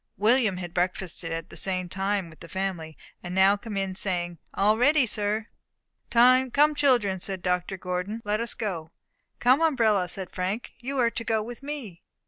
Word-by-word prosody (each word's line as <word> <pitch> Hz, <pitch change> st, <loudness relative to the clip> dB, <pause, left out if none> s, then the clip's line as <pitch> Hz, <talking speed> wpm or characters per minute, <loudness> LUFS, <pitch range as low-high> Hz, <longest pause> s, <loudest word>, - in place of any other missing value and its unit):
William 215 Hz, -2 st, +3 dB
had 175 Hz, -2 st, -6 dB
breakfasted 180 Hz, -2 st, -2 dB
at 165 Hz, 0 st, -5 dB
the -, -, -9 dB
same 185 Hz, -2 st, -2 dB
time 195 Hz, +1 st, -1 dB
with 160 Hz, -1 st, -15 dB
the 170 Hz, -, -11 dB
family, 185 Hz, -5 st, -4 dB, 0.2 s
and 175 Hz, 0 st, -6 dB
now 190 Hz, +1 st, +5 dB
came 205 Hz, 0 st, -6 dB
in, 195 Hz, -1 st, -1 dB
saying, 175 Hz, -3 st, -3 dB, 0.2 s
"All 210 Hz, +2 st, +4 dB
ready, 275 Hz, +4 st, +4 dB
sir." 210 Hz, 0 st, -1 dB, 0.6 s
"Come, 255 Hz, +2 st, +5 dB, 0.2 s
children," 245 Hz, -10 st, +2 dB
said 190 Hz, -1 st, -5 dB
Dr. 180 Hz, +1 st, -1 dB
Gordon, 180 Hz, +4 st, -3 dB
"let 210 Hz, +1 st, 0 dB
us 235 Hz, -, -2 dB
go." 175 Hz, -8 st, -4 dB, 0.5 s
"Come, 255 Hz, +5 st, +4 dB
umbrella," 225 Hz, -, +3 dB
said 190 Hz, 0 st, -4 dB
Frank, 190 Hz, +5 st, -3 dB
"you 270 Hz, +3 st, -4 dB
are 235 Hz, -2 st, +3 dB
to 230 Hz, -, -4 dB
go 220 Hz, -2 st, 0 dB
with 240 Hz, +3 st, -8 dB
me." 275 Hz, -, -7 dB
200 Hz, 175 wpm, -26 LUFS, 180-235 Hz, 0.6 s, now